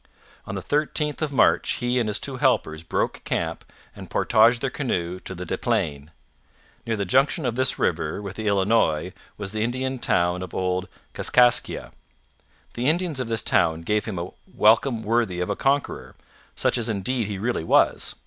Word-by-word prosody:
On -, -, -5 dB
the -, -, -5 dB
13th 150 Hz, 0 st, -1 dB
of 155 Hz, -2 st, -1 dB
March 135 Hz, -, +3 dB
he 125 Hz, 0 st, 0 dB
and 115 Hz, -3 st, 0 dB
his 105 Hz, -, +1 dB
two 135 Hz, -2 st, -3 dB
helpers 80 Hz, -9 st, +1 dB
broke 80 Hz, -, -2 dB
camp -, -, -3 dB, 0.3 s
and -, -, -10 dB
portaged 115 Hz, +2 st, +4 dB
their 135 Hz, -, -1 dB
canoe 90 Hz, -, -2 dB
to 95 Hz, -, -7 dB
the 90 Hz, +1 st, -6 dB
Des -, -, -3 dB
Plaines. 70 Hz, 0 st, -1 dB, 0.8 s
Near 115 Hz, -1 st, -1 dB
the 100 Hz, -, -1 dB
junction 135 Hz, -, +2 dB
of 120 Hz, -, 0 dB
this 130 Hz, +1 st, +2 dB
river -, -, -1 dB
with 100 Hz, -2 st, -7 dB
the 110 Hz, -1 st, -4 dB
Illinois 100 Hz, -6 st, +1 dB, 0.2 s
was 100 Hz, -2 st, -5 dB
the 110 Hz, 0 st, -1 dB
Indian 130 Hz, +2 st, -2 dB
town 90 Hz, -4 st, +1 dB
of 95 Hz, -, -7 dB
Old 90 Hz, 0 st, -1 dB, 0.3 s
Kaskaskia. 125 Hz, -1 st, +2 dB, 0.8 s
The 125 Hz, +4 st, 0 dB
Indians 165 Hz, -3 st, -1 dB
of 130 Hz, -, -2 dB
this 115 Hz, -1 st, 0 dB
town 80 Hz, 0 st, +2 dB
gave 105 Hz, +4 st, 0 dB
him 105 Hz, -5 st, -5 dB
a 85 Hz, +2 st, -5 dB, 0.2 s
welcome 115 Hz, +2 st, +3 dB
worthy 110 Hz, -5 st, 0 dB
of 90 Hz, +3 st, -1 dB
a -, -, -1 dB
conqueror, 140 Hz, +4 st, -1 dB, 0.4 s
such -, -, +1 dB
as 115 Hz, 0 st, -2 dB
indeed 110 Hz, +2 st, -1 dB
he 100 Hz, -2 st, -4 dB
really 115 Hz, -2 st, -2 dB
was. -, -, +2 dB
110 Hz, 180 wpm, -24 LUFS, 95-130 Hz, 0.8 s, portaged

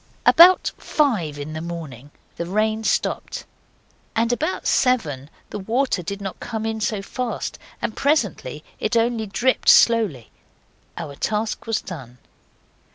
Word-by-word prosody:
About 360 Hz, +2 st, +7 dB
five 205 Hz, -, 0 dB
in 145 Hz, +2 st, -6 dB
the 155 Hz, -, -4 dB
morning 155 Hz, -6 st, -7 dB, 0.3 s
the 170 Hz, -, -4 dB
rain 215 Hz, +3 st, 0 dB
stopped; -, -, -1 dB, 0.7 s
about 245 Hz, +10 st, 0 dB
seven 150 Hz, -, +1 dB, 0.2 s
the -, -, -4 dB
water 230 Hz, +1 st, 0 dB
did 200 Hz, +4 st, -5 dB
not 195 Hz, -2 st, -6 dB
come 220 Hz, -2 st, -4 dB
in 220 Hz, 0 st, -2 dB
so 210 Hz, -2 st, -1 dB
fast, 250 Hz, +4 st, -4 dB, 0.2 s
and 220 Hz, -, -2 dB
presently 210 Hz, -, 0 dB, 0.2 s
it 225 Hz, +2 st, 0 dB
only 230 Hz, -1 st, +1 dB
dripped 245 Hz, +6 st, +1 dB
slowly. 210 Hz, -, +4 dB, 0.7 s
Our 155 Hz, -4 st, -5 dB
task 215 Hz, +7 st, -2 dB
was 225 Hz, -1 st, 0 dB
done. 135 Hz, -, -9 dB
215 Hz, 130 wpm, -22 LUFS, 165-235 Hz, 0.7 s, About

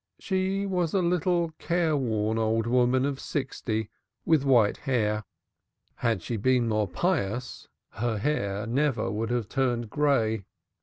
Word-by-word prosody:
She 190 Hz, +1 st, -1 dB
was 180 Hz, -3 st, -1 dB
a 190 Hz, -, +3 dB
little 175 Hz, -1 st, +1 dB
careworn 130 Hz, -11 st, 0 dB
old 110 Hz, 0 st, +1 dB
woman 125 Hz, +2 st, +3 dB
of 140 Hz, -1 st, -2 dB
sixty 110 Hz, -6 st, -3 dB, 0.3 s
with 160 Hz, -4 st, +3 dB
white 120 Hz, -7 st, +4 dB
hair. 105 Hz, -6 st, 0 dB, 0.7 s
Had 110 Hz, -7 st, 0 dB
she 115 Hz, -, -3 dB
been 125 Hz, +2 st, +2 dB
more 105 Hz, -2 st, +1 dB
pious 125 Hz, -, -2 dB, 0.2 s
her 115 Hz, 0 st, -2 dB
hair 100 Hz, -5 st, -1 dB
would 110 Hz, -, -5 dB
never 115 Hz, -6 st, 0 dB
have 115 Hz, -4 st, -2 dB
turned 120 Hz, -5 st, -1 dB
gray. 115 Hz, -8 st, +1 dB
125 Hz, 135 wpm, -27 LUFS, 110-150 Hz, 0.7 s, white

